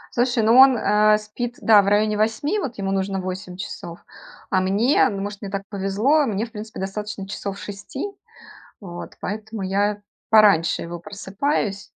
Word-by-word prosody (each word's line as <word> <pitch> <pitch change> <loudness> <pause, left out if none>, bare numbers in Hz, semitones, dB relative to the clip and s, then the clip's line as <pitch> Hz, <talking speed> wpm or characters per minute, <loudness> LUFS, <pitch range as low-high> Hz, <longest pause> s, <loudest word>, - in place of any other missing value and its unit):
Слушай, 245 -1 +1
ну 225 +2 +4
он, 265 -1 +8
э, 210 0 +4
спит, 235 +3 -6
да, 210 -2 +6
в - - -4
районе 210 +1 +2
8, 225 - 0
вот 265 - -5
ему 195 -1 -2
нужно 195 0 -1
8 185 0 -6
часов. 180 -3 -7 0.5
А 190 - +2
мне, 210 +9 +3
ну, 200 -4 -4
может, 205 +1 -6
мне 200 - -5
так 195 0 -4
повезло, 210 +10 +1
мне 215 -1 -2
в 230 - -19
принципе 215 0 -8
достаточно 195 +1 -5
часов 200 0 -5
6, 205 - -6 0.7
вот. 175 -4 -9
Поэтому 215 +1 -5
я 200 +2 0 0.3
пораньше 205 -7 +4
его 170 +1 -7
просыпаюсь. 200 - -3
205 Hz, 165 wpm, -22 LUFS, 195-220 Hz, 0.7 s, он